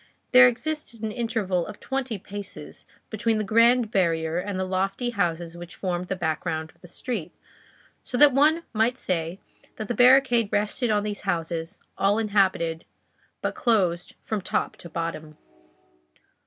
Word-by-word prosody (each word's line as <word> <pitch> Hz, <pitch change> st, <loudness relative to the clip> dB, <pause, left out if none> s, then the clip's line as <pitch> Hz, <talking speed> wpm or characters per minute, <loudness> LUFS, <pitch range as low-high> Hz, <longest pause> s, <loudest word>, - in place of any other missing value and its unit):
There 255 Hz, 0 st, +9 dB
existed 250 Hz, -2 st, -3 dB
an 220 Hz, -, -1 dB
interval 210 Hz, -6 st, -1 dB
of -, -, -9 dB
twenty 265 Hz, -4 st, -3 dB
paces 200 Hz, +1 st, -8 dB, 0.2 s
between 220 Hz, +1 st, 0 dB
the 215 Hz, -, 0 dB
grand 230 Hz, +2 st, +4 dB
barrier 165 Hz, -3 st, +1 dB
and 190 Hz, 0 st, -4 dB
the -, -, 0 dB
lofty 195 Hz, +6 st, -1 dB
houses 170 Hz, -5 st, -2 dB
which 175 Hz, 0 st, -10 dB
formed 180 Hz, -1 st, -3 dB
the 190 Hz, -, -2 dB
background 160 Hz, -2 st, -2 dB
of -, -, -32 dB
the 180 Hz, -, -13 dB
street, 205 Hz, 0 st, -5 dB, 0.7 s
so 245 Hz, -, -4 dB
that 290 Hz, 0 st, +7 dB
one 310 Hz, +5 st, +4 dB
might 230 Hz, +3 st, +1 dB
say 170 Hz, -2 st, -2 dB, 0.4 s
that 215 Hz, -, -5 dB
the 240 Hz, -, -1 dB
barricade 245 Hz, -3 st, +5 dB
rested 210 Hz, +4 st, 0 dB
on 210 Hz, -1 st, +2 dB
these 210 Hz, -1 st, -4 dB
houses, 165 Hz, -3 st, -3 dB, 0.2 s
all 200 Hz, +2 st, +3 dB
inhabited, 190 Hz, -7 st, +1 dB, 0.6 s
but -, -, -1 dB
closed 185 Hz, -8 st, +1 dB
from 215 Hz, -2 st, -2 dB
top -, -, -1 dB
to 170 Hz, -, -10 dB
bottom. 160 Hz, -2 st, -5 dB
205 Hz, 155 wpm, -25 LUFS, 175-235 Hz, 0.7 s, There